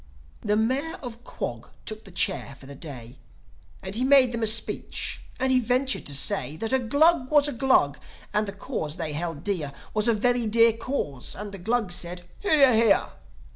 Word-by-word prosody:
The 210 0 +1
Mayor 260 +9 0
of 240 -1 -8
Quog - - -6 0.2
took 215 0 -6
the 195 - -11
chair 140 -5 -1
for - - -13
the 140 - -9
day; 130 -4 -9 0.6
And 190 0 -6
he 235 +4 +1
made 265 -2 +5
them 235 -1 -3
a 220 - +2
speech, 220 +2 0 0.2
and 260 0 +1
he 255 - +4
ventured 255 +3 0
to 140 - -1
say 140 +2 0
That 225 +6 -1
a 265 - +4
Glug 285 +3 +3
was 295 -1 +5
a 290 - -3
Glug, 235 - +2 0.3
and 210 0 +1
the - - -3
Cause 160 -6 -4
they 160 -3 -2
held 165 -1 -4
dear 175 -9 -2 0.2
Was 215 +1 +1
a 230 - +4
very 245 +1 +1
dear 230 +1 +5
Cause. 225 - -4
And 205 +1 -6
the 195 - -7
Glugs 220 -1 0
said, 175 0 -4 0.2
"Hear, 290 -10 +5
hear." 225 -2 +3
220 Hz, 195 wpm, -25 LUFS, 175-255 Hz, 0.6 s, made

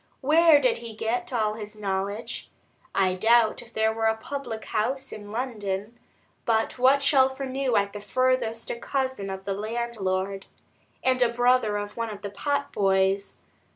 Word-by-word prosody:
Where 310 +2 +6
did 255 -4 +2
he 230 -2 -8
get 240 +3 -2
all 215 -4 +1
his 210 -1 -7
knowledge? 200 +1 -3 0.5
I 190 -2 +3
doubt 225 +3 +3
if 235 - -15
there 220 -1 +1
were 225 0 0
a 220 0 +2
public 240 -2 -6
house 260 +5 -1
in 205 -1 -9
London, 215 -3 -3 0.4
but 225 +2 0
what 270 +3 +5
Shelfer 265 -1 +3
knew 265 -2 -1
at 200 0 0
the 205 - -6
furthest 250 -1 0
a - - -3
cousin 260 -7 -2
of 190 0 -5
the 195 - -2
landlord, 200 -3 -2 0.6
and 255 -1 +2
a 245 - +5
brother 245 -3 +2
of 205 +1 -6
one 230 -1 -2
of 210 -2 -8
the 200 - -4
potboys. 200 -7 0
225 Hz, 160 wpm, -26 LUFS, 205-255 Hz, 0.6 s, Where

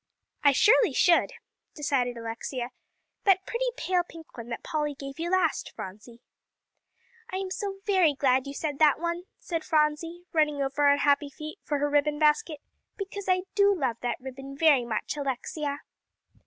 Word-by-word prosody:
"I 285 - +7
surely 420 - +5
should," 340 - +4 0.4
decided 260 -5 0
Alexia 235 +2 -5 0.5
"that 380 -1 +4
pretty - - -1
pale 365 -1 +1
pink 330 -2 -13
one 235 -1 -8
that 235 - -5
Polly 300 -3 -2
gave 275 +1 -8
you 340 +1 -2
last, 365 -3 +1
Phronsie." 215 +5 -9 1.1
"I - - -5
am 380 -1 -4
so 390 0 -4
very 370 -8 +3
glad 265 0 +2
you 275 - -5
said 290 -2 -3
that 305 -2 +5
one," 340 +1 -3
said 340 -10 -4
Phronsie, 320 +3 0
running 300 -3 +2
over 280 +1 +1
on 285 0 +5
happy 285 0 +2
feet 310 +6 -9
for 295 - -2
her 290 +1 +1
ribbon 295 +1 +2
basket, 300 0 +2 0.4
"because 395 -1 -5
I 365 0 +3
do 400 -1 +4
love 250 -5 0
that 245 - -2
ribbon 270 +1 -9
very 290 -6 +5
much, 220 +3 -3
Alexia." 285 +1 -3
300 Hz, 165 wpm, -27 LUFS, 275-350 Hz, 1.1 s, I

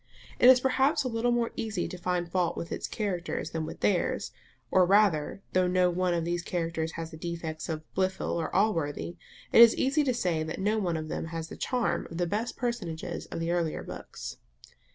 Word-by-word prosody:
It 245 - +8
is 255 -1 +8
perhaps 265 +3 +2
a - - -1
little 230 0 0
more 240 -1 +1
easy 215 -5 -2
to - - -7
find 180 -1 -1
fault 175 0 0
with 170 - -5
its - - -3
characters 180 -6 -3
than 160 -1 -3
with - - -8
theirs; 105 - +1 0.4
or 185 - +6
rather, 195 -2 +3
though 185 -1 +3
no 180 0 +3
one 180 0 +1
of 165 -1 -1
these 175 0 -1
characters 165 -2 -2
has 165 0 -6
the 160 - -9
defects 165 -1 -5
of 155 -1 -3
Blifil 190 0 0
or 165 -2 -1
of - - -12
Allworthy, 170 -4 0 0.3
it - - +8
is 235 -1 +9
easy 280 +3 +2
to 260 -3 +1
say 175 -8 0
that 160 0 -4
no 210 +3 +1
one 175 -5 0
of 155 0 -5
them 155 - -3
has 165 0 -5
the - - -7
charm 250 -2 -1
of 165 - -7
the 175 - +1
best 215 +7 -2
personages 180 -9 -3
of - - -5
the 165 +1 -1
earlier 170 -3 -1
books. - - -8
175 Hz, 215 wpm, -29 LUFS, 165-215 Hz, 0.4 s, is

